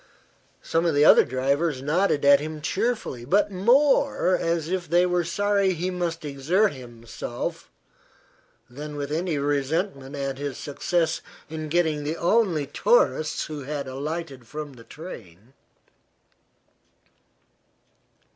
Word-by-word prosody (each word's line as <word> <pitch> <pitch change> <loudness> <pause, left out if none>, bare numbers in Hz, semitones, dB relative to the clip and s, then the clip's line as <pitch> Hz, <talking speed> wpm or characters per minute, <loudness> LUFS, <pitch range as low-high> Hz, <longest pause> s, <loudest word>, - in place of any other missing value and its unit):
Some 165 +1 0
of 160 - +1
the 145 +1 +5
other - - +8
drivers 140 +4 0
nodded 150 -1 +1
at 140 0 +7
him 155 +1 -5
cheerfully, 200 - -2
but 200 +10 +2
more 235 -1 +3
as 165 -2 -1
if 180 -2 -3
they 175 +2 +4
were 180 -1 +1
sorry 200 +2 +1
he 180 +2 -2
must 170 -3 -3
exert 155 +9 +1
himself 120 -2 -7 1.0
than 150 +4 -8
with 145 0 -4
any 165 0 -1
resentment 145 +1 -1
at 135 -1 -3
his 145 -3 -4
success 165 +3 -1 0.3
in 155 -1 -5
getting 160 -3 +1
the 155 +3 -3
only 175 -5 +2
tourists 165 - +2
who 150 -2 -6
had 145 -1 -4
alighted 140 -1 -5
from 150 0 -7
the 115 -3 -14
train. 115 - -11
155 Hz, 125 wpm, -25 LUFS, 140-180 Hz, 1.0 s, other